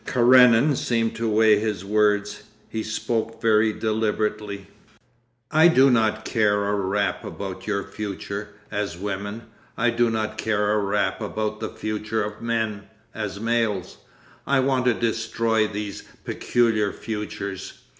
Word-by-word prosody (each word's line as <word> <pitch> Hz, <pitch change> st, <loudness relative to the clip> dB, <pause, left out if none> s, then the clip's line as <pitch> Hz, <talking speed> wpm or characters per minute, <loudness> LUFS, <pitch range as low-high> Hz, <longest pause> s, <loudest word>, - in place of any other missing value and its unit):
Karenin 125 Hz, +2 st, +5 dB
seemed 115 Hz, -2 st, 0 dB
to 115 Hz, -1 st, -1 dB
weigh 110 Hz, -1 st, +5 dB
his 105 Hz, -3 st, -3 dB
words. 105 Hz, 0 st, +1 dB, 0.3 s
He 110 Hz, -, -3 dB
spoke 115 Hz, +1 st, -2 dB
very 110 Hz, -1 st, +3 dB
deliberately. 105 Hz, -2 st, -2 dB, 0.9 s
'I 160 Hz, +2 st, +6 dB
do 135 Hz, -5 st, +5 dB
not 110 Hz, -2 st, +1 dB
care 105 Hz, -3 st, +2 dB
a -, -, +1 dB
rap 100 Hz, 0 st, -1 dB
about 95 Hz, -1 st, -7 dB
your 100 Hz, -2 st, 0 dB
future—as 100 Hz, -1 st, -5 dB
women. 100 Hz, +3 st, -4 dB, 0.3 s
I 120 Hz, +1 st, +2 dB
do 120 Hz, 0 st, +2 dB
not 110 Hz, -1 st, -2 dB
care 105 Hz, -1 st, +1 dB
a 105 Hz, -, +2 dB
rap 100 Hz, +2 st, 0 dB
about 110 Hz, +2 st, -3 dB
the 110 Hz, -, -3 dB
future 110 Hz, 0 st, -3 dB
of 105 Hz, +1 st, -6 dB
men—as 110 Hz, -3 st, -4 dB
males. 115 Hz, -4 st, -1 dB, 0.5 s
I 140 Hz, -1 st, +3 dB
want 130 Hz, -1 st, +1 dB
to 125 Hz, -2 st, +3 dB
destroy 115 Hz, -1 st, 0 dB
these 105 Hz, -1 st, -5 dB, 0.2 s
peculiar 110 Hz, -4 st, +1 dB
futures. 105 Hz, -3 st, -6 dB
110 Hz, 130 wpm, -24 LUFS, 105-115 Hz, 0.9 s, I